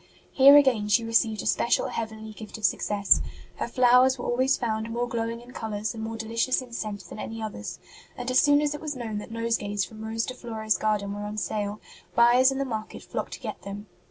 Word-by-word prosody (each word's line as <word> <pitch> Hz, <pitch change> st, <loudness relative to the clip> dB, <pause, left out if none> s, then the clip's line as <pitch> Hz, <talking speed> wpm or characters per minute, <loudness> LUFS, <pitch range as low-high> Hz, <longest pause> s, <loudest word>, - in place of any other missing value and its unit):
Here 280 Hz, +2 st, +8 dB
again 250 Hz, -7 st, +3 dB
she 230 Hz, +3 st, +3 dB
received 225 Hz, -2 st, +1 dB
a -, -, -8 dB
special 235 Hz, -, +1 dB
heavenly 220 Hz, -1 st, -5 dB
gift 215 Hz, 0 st, -9 dB
of 215 Hz, -, -1 dB
success; 200 Hz, -, +3 dB, 0.4 s
her -, -, -2 dB
flowers 250 Hz, +2 st, +5 dB
were 245 Hz, -, -6 dB
always 260 Hz, +3 st, +2 dB
found 220 Hz, -2 st, -2 dB
more 240 Hz, +1 st, -2 dB
glowing 230 Hz, 0 st, -3 dB
in 245 Hz, +1 st, -14 dB
colours 215 Hz, 0 st, -3 dB
and 225 Hz, -, -7 dB
more 225 Hz, 0 st, -4 dB
delicious 230 Hz, +3 st, 0 dB
in 250 Hz, -2 st, -10 dB
scent 210 Hz, -3 st, -4 dB
than -, -, -9 dB
any 225 Hz, +1 st, -6 dB
others; 215 Hz, -, -6 dB, 0.4 s
and 245 Hz, +1 st, -3 dB
as 255 Hz, -, +5 dB
soon 290 Hz, 0 st, +5 dB
as 295 Hz, -1 st, 0 dB
it 295 Hz, -, -7 dB
was 300 Hz, -2 st, -4 dB
known 225 Hz, -4 st, -4 dB
that 210 Hz, -, -9 dB
nosegays 225 Hz, -4 st, -1 dB
from 220 Hz, -1 st, -11 dB
Rose 225 Hz, +1 st, -2 dB
de 255 Hz, -, -5 dB
Flores 220 Hz, -3 st, -2 dB
garden 210 Hz, -2 st, -1 dB
were 205 Hz, -, -6 dB
on 210 Hz, +1 st, -6 dB
sale, 210 Hz, 0 st, -2 dB, 0.4 s
buyers 245 Hz, +3 st, +6 dB
in 270 Hz, -, -3 dB
the 275 Hz, -, -1 dB
market 220 Hz, -4 st, -5 dB
flocked -, -, -5 dB
to -, -, -7 dB
get -, -, -6 dB
them. 200 Hz, +1 st, -7 dB
225 Hz, 220 wpm, -26 LUFS, 215-245 Hz, 0.4 s, Here